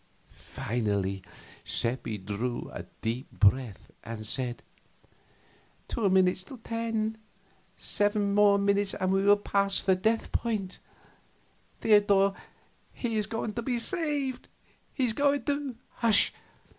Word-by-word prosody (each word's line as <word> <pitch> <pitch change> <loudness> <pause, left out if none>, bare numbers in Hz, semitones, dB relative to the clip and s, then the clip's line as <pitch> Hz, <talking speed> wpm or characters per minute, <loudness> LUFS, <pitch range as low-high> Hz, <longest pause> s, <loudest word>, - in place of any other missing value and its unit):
Finally 100 -4 -2 0.4
Seppi 115 -2 -1
drew 105 +5 -4
a - - -7 0.2
deep 115 +4 -3
breath 105 0 +1
and 110 0 -7
said: 125 +2 -3 1.2
"Two 220 -5 0
minutes 185 0 +3
to 260 - -10
ten. 225 -1 -2 0.6
Seven 205 -1 0
minutes 200 -1 +3
more - - -3
and 190 - +2
he 195 - +2
will 205 +1 +6
pass 200 -1 +1
the 190 - +4
death 220 +5 0
point. 210 -5 -2 1.0
Theodor, 200 -2 +4 0.6
he 230 -3 -3
is 210 -1 0
going 225 -1 -3
to 235 - -3
be 245 +1 -1
saved! 290 -2 -1 0.4
He's 250 -5 0
going 285 +1 +2
to 285 -2 -2
" - - -39
"Hush! 225 -3 +5
200 Hz, 120 wpm, -28 LUFS, -, 1.2 s, will